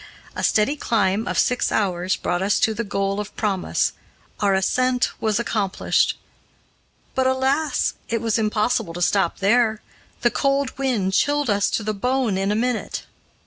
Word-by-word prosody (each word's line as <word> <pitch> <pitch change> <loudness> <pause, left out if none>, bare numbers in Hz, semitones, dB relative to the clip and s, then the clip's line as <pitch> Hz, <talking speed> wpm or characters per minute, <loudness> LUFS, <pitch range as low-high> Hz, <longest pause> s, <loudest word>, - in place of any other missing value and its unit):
A - - -4
steady 215 +7 +2
climb 220 -4 0
of - - -2
six 250 - +1
hours 185 -2 0
brought 175 0 -2
us 195 +1 +2
to 220 - +3
the 225 +2 -3
goal 195 -1 -1
of 210 - -6
promise; 200 -4 0 0.5
our 200 -2 +2
ascent 250 +6 +1
was 215 -1 +1
accomplished. 210 -5 0 1.0
But 260 0 +1
alas! 265 +4 +1 0.2
it 230 - 0
was 225 0 0
impossible 215 -3 0
to 175 - -5
stop 185 -1 +1
there 220 +2 +2 0.4
the 240 - +3
cold 275 -1 0
wind 225 -9 0
chilled 290 +1 +2
us 200 0 +2
to 220 - -1
the 215 +1 -1
bone 250 0 0
in 195 +1 0
a - - +1
minute. 245 +1 -2
220 Hz, 160 wpm, -22 LUFS, 195-250 Hz, 1.0 s, to